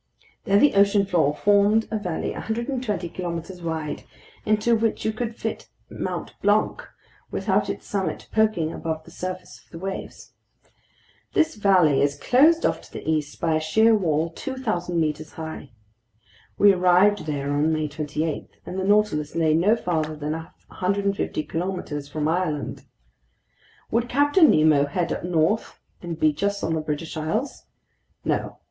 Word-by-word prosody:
There 200 - +4
the 290 +7 +5
ocean 200 0 +4
floor 165 -6 +2
formed 205 +6 +3
a 220 - -1
valley 180 -5 -3
120 230 -5 -3
kilometers 175 +1 -5
wide, 160 -2 -3 0.5
into 215 +2 +3
which 225 0 -1
you 220 - +1
could 230 0 -4
fit - - -5 0.2
Mt. - - -4
Blanc 205 +2 +2 0.5
without - - 0
its - - -5
summit 195 -2 -3
poking 215 -8 +1
above 160 -1 -4
the 170 - -15
surface 185 +1 -6
of - - -33
the 165 - -10
waves. 190 +3 -7 1.0
This 315 - +2
valley 185 -9 +4
is 140 0 +1
closed 315 +7 +4
off - - 0
to - - -17
the - - -8
east 155 -2 -1
by 165 -1 +1
a 155 - +2
sheer 220 +9 +4
wall 165 -5 +1
2,000 180 -7 -3
meters 155 -1 -2
high. 160 -3 -7 0.9
We 200 -1 +6
arrived 185 +1 +3
there 145 -1 -2
on 150 +2 +2
May 155 -1 0
28, 150 +1 -3 0.2
and 185 +2 -5
the - - -1
Nautilus 200 -7 +2
lay 160 -2 +3
no 185 +8 +4
farther 160 -7 -2
than 150 0 -4
150 190 +3 -2
kilometers 165 -4 -4
from 150 0 -2
Ireland. 160 -3 -2 1.1
Would 235 +1 +1
Captain 290 +5 +5
Nemo 155 -2 +4
head 170 +4 -1
up - - -5
north 175 +5 0 0.2
and 170 -2 -6
beach 155 +3 +1
us 200 0 0
on 160 - 0
the 160 - -1
British 155 +1 -4
Isles? 210 - -3 0.6
No. - - -1
175 Hz, 155 wpm, -24 LUFS, 155-205 Hz, 1.1 s, We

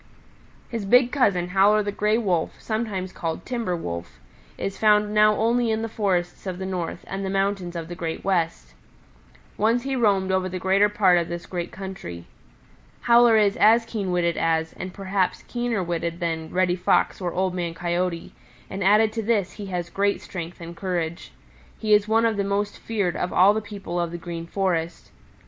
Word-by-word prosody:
"His 230 -3 -4
big 245 +5 +4
cousin, 190 -10 +1
Howler 200 +3 +4
the 205 - -2
Gray 210 +2 +1
Wolf, 185 -8 -1
sometimes 210 -5 -3
called 165 -2 -4
Timber 235 -8 -2
Wolf 85 - -6 0.4
is 195 - -4
found 210 -1 +3
now 215 0 +5
only 235 +2 +1
in 220 0 0
the - - -1
forests 190 -4 -2
of 185 -1 -3
the 190 - -5
North 180 -3 -4
and 195 +1 -5
the 190 - -2
mountains 195 -2 -1
of 165 -1 -4
the 175 - -6
Great 165 -2 -4
West. 165 - -1 0.9
Once 230 +3 +2
he 270 0 -2
roamed 200 -6 +2
over 190 0 0
the 185 - -4
greater 195 +3 +3
part 190 -4 +4
of 170 - -2
this 170 0 -5
great 175 -2 -5
country. 185 - -8 0.8
Howler 235 -1 +6
is 205 -2 +3
as 225 +2 +5
keen 205 -5 -3
witted 170 -1 +1
as, 160 0 0
and 185 - -6
perhaps 190 -1 -1
keener 240 -5 -1
witted 170 0 -3
than, 165 -2 -2
Reddy 180 -1 +1
Fox 180 +2 +1
or 175 -1 -2
Old 185 0 -1
Man 170 -2 -3
Coyote, 175 0 -2 0.4
and 195 0 -3
added 215 +3 +4
to 225 - -2
this 210 -4 0
he 205 -2 -8
has 175 -2 -4
great 200 +1 +1
strength 175 -2 -7
and 170 0 -8
courage. 170 -2 -3 0.5
He 215 -1 +1
is 210 0 +4
one 225 +1 +3
of 225 -2 +1
the 200 - +1
most 200 +1 -2
feared 200 -6 -1
of 180 - -2
all 195 +3 +6
the 220 - -1
people 200 -4 -5
of 170 -1 -1
the 175 - -6
Green 170 -1 -6
Forest. 170 -3 -2
190 Hz, 190 wpm, -24 LUFS, 175-210 Hz, 0.9 s, Howler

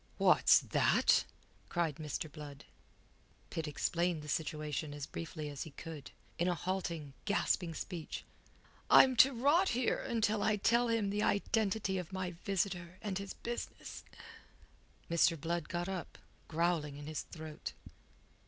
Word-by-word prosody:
"What's - - +6
that?" - - +3 0.4
cried 165 -5 0
Mr. 155 0 -3
Blood. 145 -2 -10 0.9
Pitt 160 -1 -3
explained 170 +2 0
the - - -9
situation 150 -1 -2
as 145 -1 -4
briefly 155 -1 -6
as 145 -2 -6
he 160 - -4
could, 155 -1 -8 0.3
in 170 - +2
a 180 - +2
halting, 170 -4 -3
gasping 180 -4 +1
speech. 170 -2 -5 0.7
"I'm 260 -1 +8
to 270 +3 +8
rot 290 +10 +3
here 245 0 +1
until 220 -2 +1
I 215 +1 +3
tell 235 +4 +3
him 225 -4 +1
the 205 +1 0
identity 200 -2 +1
of 180 0 -7
my 185 -1 -3
visitor 180 -1 -2
and 195 -3 -2
his 200 -1 -6
business." 240 0 -6 1.0
Mr. 165 -1 +3
Blood 170 +1 -2
got 175 0 -2
up, 190 -3 -5 0.3
growling 160 -3 0
in 145 - -8
his 155 0 -3
throat. 155 -2 -7
175 Hz, 140 wpm, -34 LUFS, 155-200 Hz, 1.0 s, I'm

